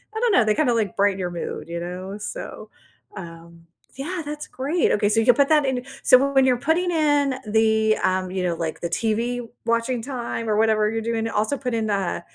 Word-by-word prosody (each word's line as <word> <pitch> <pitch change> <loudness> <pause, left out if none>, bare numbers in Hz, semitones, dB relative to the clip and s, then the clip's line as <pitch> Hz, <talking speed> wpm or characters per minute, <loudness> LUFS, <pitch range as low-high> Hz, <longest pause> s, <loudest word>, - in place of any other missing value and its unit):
I - - -1
don't 475 -1 +2
know? 245 - +4
They 215 0 +2
kinda, 280 -6 +2
like, 220 -5 -1
brighten 200 -1 +2
your 180 -1 -2
mood, 170 - -5
you 170 0 -5
know? 180 +3 -6
So, 355 - -7 0.5
um, 170 -2 -11 0.3
yeah, 330 +7 -4
that's 295 0 -6
great 290 +7 0
okay, 205 0 +1
so 225 - +2
you’ll 245 +2 +5
put 280 - +2
that 300 -2 +4
in 265 - -1 0.3
so - - +10 0.2
when 270 -1 +5
you’re 250 -2 +2
putting 355 +2 +2
in, 295 -3 +2 0.3
the, 220 0 +3
um 185 0 -1
you 185 - -1
know, 170 -2 0
like 160 - -4
the 170 - -2
TV-watching 230 +1 -1
time, 240 -2 -4
or 210 - +2
whatever 220 -1 +3
you’re 225 +1 -2
doing? 225 -1 -1
Also, 220 +5 0
put 250 -2 -4
in, 220 -1 -1
uh, 195 -3 -1
225 Hz, 210 wpm, -23 LUFS, 200-270 Hz, 0.5 s, so